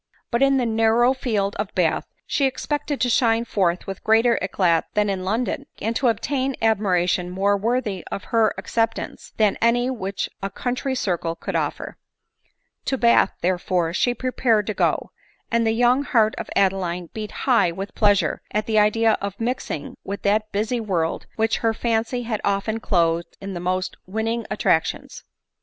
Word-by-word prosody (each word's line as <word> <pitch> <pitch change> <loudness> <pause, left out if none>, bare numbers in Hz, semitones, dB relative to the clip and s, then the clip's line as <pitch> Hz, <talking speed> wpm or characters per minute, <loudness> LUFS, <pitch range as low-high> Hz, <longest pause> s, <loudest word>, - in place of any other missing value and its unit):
But 235 +1 +1
in 275 0 +4
the 250 - +1
narrower 225 +2 +3
field 210 -6 -1
of 205 0 -4
Bath 175 -4 +1 0.2
she 280 - +1
expected 290 +2 -3
to 250 - +3
shine 230 -1 +2
forth 180 -6 0
with 195 - -7
greater 225 +2 +4
eclat 180 -3 +1
than 210 -1 +2
in 190 -1 -3
London, 235 +7 -2
and 225 +2 -2
to 255 - +1
obtain 260 +4 0
admira 200 -5 +2
tion 180 0 0
more 195 +3 +1
worthy 210 -3 -1
of 200 - -4
her 225 -1 +4
acceptance 225 +4 -2
than 210 -2 +2
any 245 +2 +3
which 195 -5 -3
a 195 - -2
country 255 +6 -2
circle 175 -7 -1
could - - -5
offer - - -3 0.9
To 265 - 0
Bath, 235 -1 +4
therefore, 180 -1 0
she 245 +6 +1
prepared 240 -3 +1
to 215 - -2
go; - - 0 0.4
and 230 0 +2
the - - +3
young 245 +3 +3
heart 220 -6 +3
of - - -6
Adeline 180 -3 0
beat 215 -1 -5
high 240 -10 +4
with 195 +4 -6
pleasure 205 -3 +2
at 210 +1 -1
the 220 -2 +2
idea 220 +1 +3
of 200 0 -5
mixing 230 - -3
\yith 200 +1 -6
that 215 +1 +1
busy 220 +4 -1
world 180 -7 -2
which 225 0 +1
her 225 -1 +1
fancy 230 +2 -1
had 225 -3 -3
often 200 +3 0
clothed 170 -5 0
in 195 0 -6
the 175 - -4
most 185 +1 -2
winning 225 +3 -2
attractions. - - 0
220 Hz, 170 wpm, -23 LUFS, 195-235 Hz, 0.9 s, in